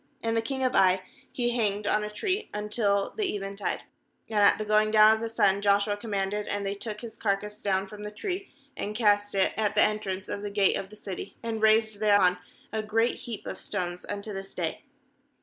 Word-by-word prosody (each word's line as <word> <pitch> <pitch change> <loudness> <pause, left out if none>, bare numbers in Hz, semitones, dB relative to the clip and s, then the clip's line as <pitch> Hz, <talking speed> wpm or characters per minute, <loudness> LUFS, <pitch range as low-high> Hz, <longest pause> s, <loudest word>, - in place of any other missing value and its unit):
29And 225 0 0
the 225 - +2
king 265 +3 -3
of 255 - +1
Ai 185 0 +4 0.3
he 240 -1 0
hanged 210 -3 0
on 210 +1 +2
a 210 - -3
tree 375 - -2
until 210 -1 0
the 415 - -1
eventide; 195 0 -3 0.5
and 215 - +2
at 200 - +6
the 215 - -3
going 215 0 +3
down 215 0 +7
of 220 - -1
the 230 0 -3
sun 200 -3 +2
Joshua 205 0 +3
com 220 +2 -9
manded, 200 +1 -1
and 205 0 -2
they 195 - -1
took 210 +1 -6
his 230 -2 -8
carcass 210 +1 -2
down 190 -1 +1
from 210 +1 -10
the 210 - -5
tree, 370 - -5 0.2
and 210 +1 -4
cast 205 -2 +2
it 190 -1 +2
at 215 -1 0
the - - +6
entrance 195 -3 -1
of 205 - -4
the 205 - -4
gate 200 -1 +3
of 190 - -4
the 215 - -14
city, 195 -3 -7
and 225 -1 -3
raised 220 -1 +4
thereon 200 -4 +4 0.3
a 220 - 0
great 225 +3 +1
heap 235 -4 -7
of - - -6
stones, 180 -3 -3
unto 205 +1 -4
this 195 0 -7
day. 170 -3 -3
210 Hz, 220 wpm, -28 LUFS, 200-220 Hz, 0.5 s, down